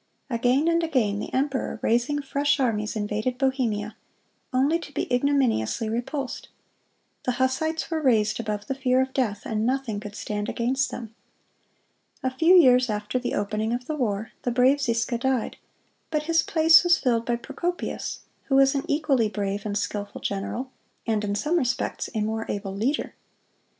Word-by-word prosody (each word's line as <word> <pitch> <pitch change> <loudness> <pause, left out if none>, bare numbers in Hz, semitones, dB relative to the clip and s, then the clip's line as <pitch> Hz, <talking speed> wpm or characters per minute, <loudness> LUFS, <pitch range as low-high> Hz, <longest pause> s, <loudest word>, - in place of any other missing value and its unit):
Again 250 +6 +2
and 335 0 +3
again 240 -11 +1
the - - -5
emperor, 270 0 -1
raising 240 +6 +1
fresh 285 +1 +1
armies, 220 -4 0
invaded 215 +4 -2
Bohemia, 240 -6 0 0.6
only 280 +6 +2
to 315 - -10
be - - -2
ignominiously 245 - +1
repulsed. 255 +4 -4 0.8
The 250 - +1
Hussites 290 +7 -1
were 320 -1 0
raised 220 -7 +2
above 210 -2 -3
the - - -2
fear 260 -1 +1
of 260 0 0
death, 215 -7 -1
and 215 -1 -1
nothing 250 -4 -1
could 210 0 -8
stand 210 +1 -3
against 260 +3 0
them. 230 -2 -7 1.1
A 260 - 0
few 330 +7 +5
years 255 -7 +6
after 210 +4 -1
the 245 - -2
opening 215 +2 -1
of 245 +1 -3
the 310 - -3
war, 220 -6 -2
the - - -1
brave 255 +4 +3
Ziska 235 -1 0
died; 260 -2 -1 0.5
but 305 -2 -1
his 330 +1 +3
place 325 +1 +6
was 350 -1 +5
filled 235 -3 +1
by 240 - +2
Procopius, 345 +9 -4 0.2
who 270 - +1
was 270 +1 +5
an 275 -1 -2
equally 280 -7 +2
brave 205 0 -3
and 205 0 -1
skilful 205 0 -4
general, 235 +6 -3 0.3
and 220 -2 0
in 205 -1 -1
some 300 +11 +1
respects 250 -3 -2
a 215 - 0
more 220 +1 -2
able 195 -1 -3
leader. 250 +9 -1
250 Hz, 165 wpm, -25 LUFS, 215-275 Hz, 1.1 s, years